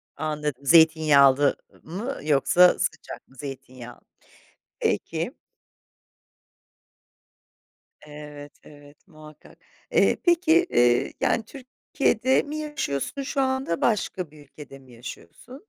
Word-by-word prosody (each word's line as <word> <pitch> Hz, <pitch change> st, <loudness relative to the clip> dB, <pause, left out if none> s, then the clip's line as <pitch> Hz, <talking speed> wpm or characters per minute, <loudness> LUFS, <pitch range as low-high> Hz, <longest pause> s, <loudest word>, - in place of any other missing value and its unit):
Anladım. 150 Hz, -3 st, -4 dB
Zeytinyağlı, 145 Hz, -3 st, +5 dB, 0.3 s
ı -, -, -18 dB
mı 230 Hz, +10 st, -5 dB
yoksa 155 Hz, +5 st, +4 dB
sıcak -, -, -5 dB
mı 135 Hz, -, -23 dB
zeytinyağı? 130 Hz, -3 st, -10 dB, 0.8 s
Peki. -, -, -2 dB, 2.7 s
Evet, 150 Hz, -1 st, -11 dB
evet, 145 Hz, +4 st, -18 dB
muhakkak. 155 Hz, -3 st, -16 dB, 0.3 s
Eee, -, -, +3 dB
peki, 345 Hz, 0 st, +3 dB
eee, 120 Hz, 0 st, +2 dB
yani, 230 Hz, -, +1 dB
Türkiye'de 260 Hz, -1 st, -1 dB
mi 300 Hz, +1 st, -6 dB
yaşıyorsun 295 Hz, -, -4 dB
şu 275 Hz, +1 st, -2 dB
anda 265 Hz, -10 st, -1 dB
başka 185 Hz, -7 st, -1 dB
bir 150 Hz, -1 st, -16 dB
ülkede 140 Hz, -1 st, -13 dB
mi 130 Hz, -2 st, -19 dB
yaşıyorsun? 120 Hz, -, -12 dB
155 Hz, 100 wpm, -24 LUFS, -, 2.7 s, Zeytinyağlı